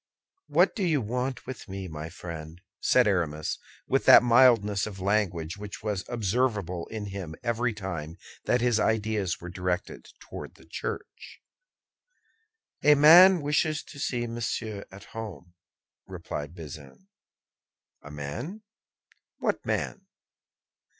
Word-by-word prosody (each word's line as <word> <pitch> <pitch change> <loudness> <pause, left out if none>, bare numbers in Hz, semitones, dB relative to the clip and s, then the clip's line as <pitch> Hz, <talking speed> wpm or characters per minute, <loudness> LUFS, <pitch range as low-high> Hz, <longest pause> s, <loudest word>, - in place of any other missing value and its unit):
"What - - +3
do 210 - -1
you 160 -5 +2
want 125 +3 -3
with 130 -6 -8
me, 95 0 -5
my 80 -1 -6
friend?" 80 -1 -8 0.2
said 125 -1 +4
Aramis, 80 -7 -1 0.3
with - - +1
that - - +9
mildness 115 -5 +4
of 100 -2 -8
language 95 -4 0
which 105 0 -8
was 105 -4 -2
observable 105 -6 -1
in 110 -2 -5
him 95 -5 -6
every 120 0 0
time 90 -6 -6 0.3
that 120 - +2
his 120 -2 +2
ideas 105 -4 0
were 90 - -8
directed 90 0 -3
toward - - -9
the - - -18
Church. - - -7 1.4
"A 150 0 +7
man 170 +5 +8
wishes 150 +1 +1
to 140 - -12
see 120 -3 -1
Monsieur 115 -3 -4
at 95 +1 -11
home," 105 -6 -8 0.5
replied 75 +4 -6
Bazin. 75 - -11 0.9
"A 75 - -11
man! 115 - -6 0.7
What - - -1
man?" - - -3
105 Hz, 125 wpm, -27 LUFS, 90-125 Hz, 1.4 s, that